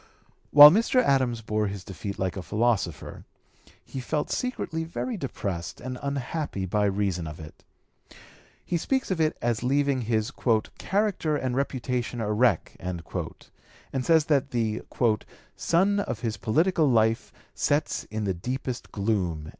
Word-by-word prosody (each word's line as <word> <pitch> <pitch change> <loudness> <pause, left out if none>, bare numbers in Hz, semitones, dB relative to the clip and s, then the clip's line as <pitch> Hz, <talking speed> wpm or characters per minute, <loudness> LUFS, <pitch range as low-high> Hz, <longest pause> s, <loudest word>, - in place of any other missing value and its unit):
While 145 +1 +11
Mr. 230 +7 +3
Adams 130 - +2
bore 105 -1 0
his 100 -2 -6
defeat 100 +1 -6
like 95 -1 -2
a 95 - -4
philosopher, 115 +3 -1 0.6
he 135 - -6
felt 150 +4 -2
secretly 170 -10 -2
very 175 +9 -4
depressed 100 - -4
and 125 0 -6
unhappy 140 -6 -3
by 105 +3 +1
reason 95 -4 -1
of 75 - -8
it. 80 -1 -12 1.0
He 175 - 0
speaks 265 +7 -1
of 175 -3 0
it 155 0 +1
as 120 -1 0
leaving 140 +1 +1
his 110 +1 0
"character 155 - 0
and 130 -3 -2
reputation 125 -3 -2
a 105 -1 -1
wreck," 110 -5 +2
and 90 -2 -5 1.0
says 160 +3 +4
that 145 -5 +2
the 110 -2 -1 0.7
"sun 195 +4 +2
of 200 - -3
his 115 -3 -2
political 160 +6 +2
life 110 -2 +2 0.2
sets 145 +2 0
in 110 0 -4
the 95 -2 0
deepest 125 +7 -5
gloom." 95 -7 -1
120 Hz, 140 wpm, -26 LUFS, 105-150 Hz, 1.0 s, While